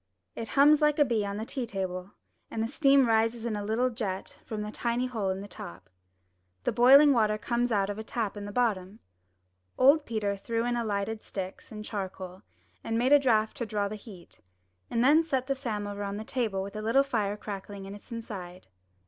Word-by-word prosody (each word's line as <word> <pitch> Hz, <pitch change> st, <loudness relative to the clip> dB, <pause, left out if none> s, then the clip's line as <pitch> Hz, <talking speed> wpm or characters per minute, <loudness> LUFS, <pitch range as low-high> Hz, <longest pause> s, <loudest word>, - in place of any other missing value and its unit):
It 225 Hz, -, -5 dB
hums 295 Hz, +2 st, +7 dB
like 300 Hz, -1 st, +3 dB
a 295 Hz, -, +5 dB
bee 230 Hz, -5 st, 0 dB
on 200 Hz, 0 st, -4 dB
the 220 Hz, -, -4 dB
tea 255 Hz, -1 st, -3 dB
table, 190 Hz, -1 st, -4 dB, 0.4 s
and 225 Hz, -, -2 dB
the -, -, -1 dB
steam 275 Hz, 0 st, +4 dB
rises 225 Hz, +1 st, +1 dB
in 230 Hz, -2 st, -1 dB
a 205 Hz, -, -3 dB
little 230 Hz, +5 st, +1 dB
jet 205 Hz, -5 st, -5 dB
from 210 Hz, -1 st, -4 dB
a 210 Hz, -, -5 dB
tiny 235 Hz, +2 st, -1 dB
hole 225 Hz, -6 st, -2 dB
in 190 Hz, +1 st, -2 dB
the 200 Hz, -, -8 dB
top. 95 Hz, -, -10 dB, 0.7 s
The -, -, +1 dB
boiling 275 Hz, +4 st, +7 dB
water 215 Hz, -3 st, +2 dB
comes 240 Hz, +3 st, -1 dB
out 200 Hz, -3 st, +2 dB
of 205 Hz, +1 st, -4 dB
a -, -, -4 dB
tap 220 Hz, -2 st, -3 dB
at 205 Hz, -, -6 dB
the 205 Hz, -, -6 dB
bottom. 205 Hz, -4 st, 0 dB, 0.8 s
Old 285 Hz, +4 st, +6 dB
Peter 210 Hz, -3 st, -1 dB
threw 230 Hz, +3 st, -2 dB
in 245 Hz, -, 0 dB
the 240 Hz, -1 st, 0 dB
lighted 215 Hz, +1 st, -2 dB
sticks 190 Hz, +2 st, -7 dB
and 210 Hz, -1 st, -7 dB
charcoal, 190 Hz, -3 st, -6 dB, 0.4 s
and 225 Hz, 0 st, -1 dB
made 255 Hz, +4 st, +3 dB
a 290 Hz, -, +8 dB
draught 220 Hz, -5 st, +2 dB
to 240 Hz, -, -2 dB
draw 205 Hz, -1 st, -1 dB
the 205 Hz, -, -6 dB
heat, 195 Hz, -, -13 dB, 0.5 s
and 235 Hz, -, +1 dB
then 295 Hz, +5 st, +6 dB
set 270 Hz, -6 st, -1 dB
the 275 Hz, -, 0 dB
samovar 210 Hz, -6 st, -4 dB
on 200 Hz, 0 st, -3 dB
the 215 Hz, -, -5 dB
table 220 Hz, -6 st, -1 dB
with 200 Hz, -, -7 dB
the 215 Hz, -, -5 dB
little 230 Hz, +6 st, +3 dB
fire 210 Hz, -7 st, -1 dB
crackling 200 Hz, -1 st, -7 dB
in 195 Hz, -, -8 dB
its 205 Hz, -, -13 dB
inside. 185 Hz, -, -7 dB
220 Hz, 215 wpm, -29 LUFS, 200-245 Hz, 0.8 s, a